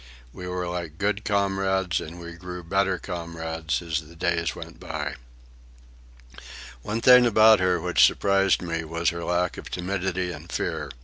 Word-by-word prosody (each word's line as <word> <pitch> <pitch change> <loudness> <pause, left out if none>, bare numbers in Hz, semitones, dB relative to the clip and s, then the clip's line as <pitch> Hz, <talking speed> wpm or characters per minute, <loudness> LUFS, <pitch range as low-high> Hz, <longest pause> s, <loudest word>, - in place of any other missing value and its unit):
We 90 - -8
were 90 0 -3
like 85 -3 -5
good 105 +2 -1
comrades, 95 -2 0
and 85 +3 -8
we 85 0 -8
grew 90 +1 -8
better 95 +2 +1
comrades 80 -2 -4
as 85 -1 -1
the 80 +2 -15
days 85 0 -1
went - - -10
by. 75 -3 -4 1.7
One 110 - -3
thing 125 0 +8
about 110 -1 +6
her 90 -1 +2
which 90 +1 +3
surprised 95 -2 +3
me 85 -1 -2
was 85 +1 0
her 85 0 -6
lack 90 0 0
of - - -8
timidity 90 0 -2
and 80 +1 -10
fear. 75 - -2
90 Hz, 160 wpm, -25 LUFS, 85-95 Hz, 1.7 s, thing